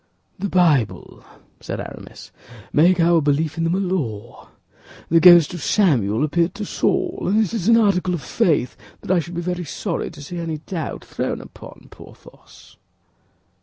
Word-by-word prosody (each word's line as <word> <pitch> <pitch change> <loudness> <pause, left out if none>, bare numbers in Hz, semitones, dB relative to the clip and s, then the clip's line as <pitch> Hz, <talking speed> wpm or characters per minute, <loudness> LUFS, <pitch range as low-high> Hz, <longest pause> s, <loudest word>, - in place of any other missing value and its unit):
"The 200 +2 -3
Bible," 160 - +1 0.4
said - - -6
Aramis, - - -10 0.4
"makes 175 +4 +4
our 170 0 +4
belief 150 +2 0
in - - 0
them 165 +2 0
a - - 0
law; 125 - -4 0.6
the 165 - +4
ghost 175 -1 +7
of 175 - -6
Samuel 130 - +1
appeared 170 +4 0
to 210 0 -5
Saul, 365 - -1
and 205 +4 +2
it 220 -1 0
is 210 -5 -2
an 230 0 +6
article 185 -5 +2
of 165 - -6
faith 160 - 0 0.3
that - - -4
I 185 - +3
should 175 +1 -7
be 170 - -2
very 180 0 -3
sorry 170 +3 -4
to 160 -3 -13
see 175 +4 -7
any 165 -2 -4
doubt 160 0 -6
thrown - - -4
upon, - - -14
Porthos." - - -17
170 Hz, 165 wpm, -21 LUFS, 155-185 Hz, 0.6 s, ghost